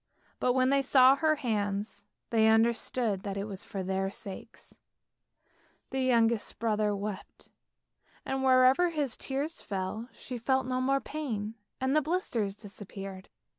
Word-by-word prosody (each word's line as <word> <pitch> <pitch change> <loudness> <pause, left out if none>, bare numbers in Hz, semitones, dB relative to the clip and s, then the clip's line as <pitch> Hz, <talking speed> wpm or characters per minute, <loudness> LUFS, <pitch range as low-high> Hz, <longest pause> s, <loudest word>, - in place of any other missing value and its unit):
But 250 - +2
when 260 +1 +3
they 275 0 +4
saw 265 0 +6
her 310 0 +3
hands, 210 -6 -2 0.3
they 220 -1 +4
understood 225 -1 +2
that 200 0 -4
it 200 - -2
was 200 -2 -7
for 195 -2 -5
their 190 +1 -1
sakes; 195 -1 -9 1.2
the 265 0 -1
youngest 235 -3 +2
brother 215 -2 +1
wept, 200 0 -7 0.8
and 265 0 -2
wherever 260 +6 +5
his 295 -7 -2
tears 280 +4 -4
fell, 200 +4 -4
she 250 -2 -7
felt 265 +2 +1
no 255 0 -1
more 275 +1 +2
pain, 230 -8 -4 0.3
and 265 +2 +1
the 305 - +5
blisters 270 - -1
disappeared. 195 -2 -9
230 Hz, 140 wpm, -30 LUFS, 205-265 Hz, 1.2 s, saw